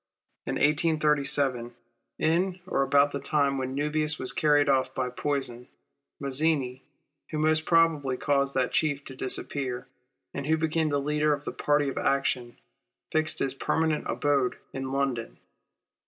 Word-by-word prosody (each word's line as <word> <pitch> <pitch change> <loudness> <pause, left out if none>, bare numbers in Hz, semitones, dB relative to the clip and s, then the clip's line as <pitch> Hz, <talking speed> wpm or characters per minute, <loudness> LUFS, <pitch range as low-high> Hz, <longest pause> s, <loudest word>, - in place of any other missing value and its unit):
In - - -1
1837, 145 -5 +1 0.4
in 180 +4 +1
or 160 - 0
about 140 +1 +4
the 140 - -3
time 140 -1 +1
when 130 0 -3
Nubius 150 +2 0
was 130 0 +1
carried 145 0 +3
off 135 -2 +1
by 125 -1 -1
poison, 125 -3 -3 0.5
Mazzini, 140 -2 0 0.5
who 155 - -3
most 155 +1 +2
probably 160 -6 +3
caused 140 0 +1
that 130 -2 +1
Chief 145 -3 0
to 135 - -9
disappear, 130 -1 -2 0.5
and 140 - -4
who 160 +1 +3
became 160 0 0
the 145 -1 +1
leader 150 +1 +1
of 145 - -13
the - - -3
party 145 -1 +1
of 135 - -2
action, 130 -3 0 0.5
fixed 155 0 +1
his 135 -1 0
permanent 160 +2 0
abode 140 -3 +1 0.2
in 135 0 -4
London. 135 -4 -2
140 Hz, 145 wpm, -27 LUFS, 135-155 Hz, 0.5 s, about